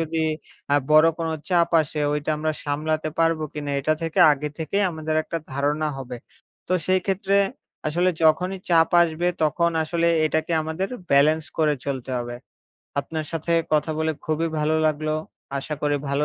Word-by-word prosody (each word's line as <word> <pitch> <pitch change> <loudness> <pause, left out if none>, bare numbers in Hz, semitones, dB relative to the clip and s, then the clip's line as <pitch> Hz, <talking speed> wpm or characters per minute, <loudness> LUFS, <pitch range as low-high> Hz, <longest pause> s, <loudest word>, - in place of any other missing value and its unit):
যদি 160 0 -1 0.5
আ - - +6
বড় 155 +1 +7
কোন 165 - -2 0.2
চাপ 175 -2 +3
আসে 150 0 -3
ওইটা 150 +1 -2
আমরা 155 +1 -1
সামলাতে 155 +2 -1
পারবো 165 -1 +2
কিনা 145 -1 -4
এটা 155 +3 +1
থেকে 165 -1 -3
আগে 150 +1 -3
থেকেই 195 +6 0
আমাদের 155 -1 -3
একটা 165 - -4
ধারণা 145 +3 0
হবে। 125 -2 -6 0.5
তো - - 0
সেই 185 0 +3
ক্ষেত্রে 195 +1 +1 0.5
আসলে 175 +4 +1
যখনই 180 +4 +3
চাপ 165 -1 +5
আসবে, 170 +1 -1 0.2
তখন 170 +2 +2
আসলে 170 +1 0 0.2
এটাকে 160 +2 -1
আমাদের 160 +5 -3 0.2
ব্যালেন্স 150 +3 +4
করে 150 -2 +3
চলতে 135 -2 -4
হবে। 120 0 -5 0.7
আপনার 155 +1 -5
সাথে 165 +1 -2 0.2
কথা 155 +1 +2
বলে 160 0 +1
খুবই 160 +1 0
ভালো 155 +1 +1
লাগলো। 155 0 0 0.4
আশা 150 +3 -4
করি 145 0 +2
ভালো 145 +2 +1
155 Hz, 165 wpm, -23 LUFS, 150-165 Hz, 0.7 s, বড়